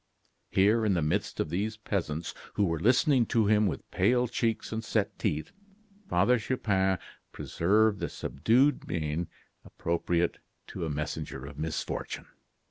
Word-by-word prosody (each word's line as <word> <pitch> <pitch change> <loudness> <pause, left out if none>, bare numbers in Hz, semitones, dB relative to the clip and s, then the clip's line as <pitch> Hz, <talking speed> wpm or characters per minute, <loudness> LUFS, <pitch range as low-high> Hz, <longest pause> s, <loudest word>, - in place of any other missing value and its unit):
'" - - -46
Here, 105 +4 +3
in 105 -3 +2
the 85 - +1
midst 90 +7 -1
of 75 - -1
these 105 +5 -1
peasants, 85 -7 -3 0.2
who 105 - +3
were 85 -3 -1
listening 125 - +4
to 115 -2 +2
him 105 0 +4
with 85 - -4
pale 125 0 +3
cheeks 115 -1 -1
and 110 0 -3
set - - -1
teeth, 75 +1 -1 0.6
Father 105 +8 +3
Chupin 95 -5 +1 0.3
preserved 105 +4 +2
the 85 -3 -2
subdued 120 - +2
mien 80 0 -2 0.4
appropriate 85 0 -1 0.3
to - - -4
a - - -3
messenger 75 -2 -4
of 70 +1 -9
misfortune. 80 +1 -3
95 Hz, 145 wpm, -29 LUFS, 85-110 Hz, 0.6 s, listening